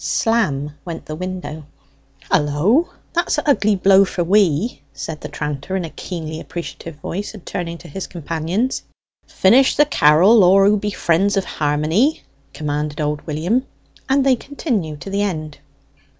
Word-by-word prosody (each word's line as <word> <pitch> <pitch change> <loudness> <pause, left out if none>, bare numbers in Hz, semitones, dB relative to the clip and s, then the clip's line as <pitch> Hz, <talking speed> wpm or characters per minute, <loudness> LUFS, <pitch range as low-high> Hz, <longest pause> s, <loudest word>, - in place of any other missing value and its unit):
Slam 150 -11 0
went 170 -3 -7
the 155 - -6
window. 175 -3 -6 0.7
"Hullo, 165 - +2 0.2
that's 345 -1 +1
a' 300 - -2
ugly 215 -7 +3
blow 195 +1 +5
for 185 -2 -2
we!" 195 +2 +2
said 155 -2 -6
the 150 - -6
tranter, 150 +4 -4
in 185 -3 -1
a 160 - -8
keenly 160 -3 -6
appreciative 170 -1 -7
voice, 190 +8 -5
and 200 - -13
turning 170 -1 -4
to 170 - -13
his 185 +5 -6
companions. 170 - -2 0.5
"Finish 250 +8 +4
the 295 - +5
carrel, 190 - +5
all 195 +2 +6
who 210 +1 +4
be 210 +1 -2
friends 195 +1 +1
of 195 - 0
harmony!" 155 - 0 0.3
commanded 150 -1 -3
old 150 -1 -1
William; 170 - 0 0.5
and 270 0 +3
they 265 -2 +5
continued 225 - -3
to 195 - -7
the 200 +1 0
end. 155 -7 -3
180 Hz, 155 wpm, -20 LUFS, 155-210 Hz, 0.7 s, all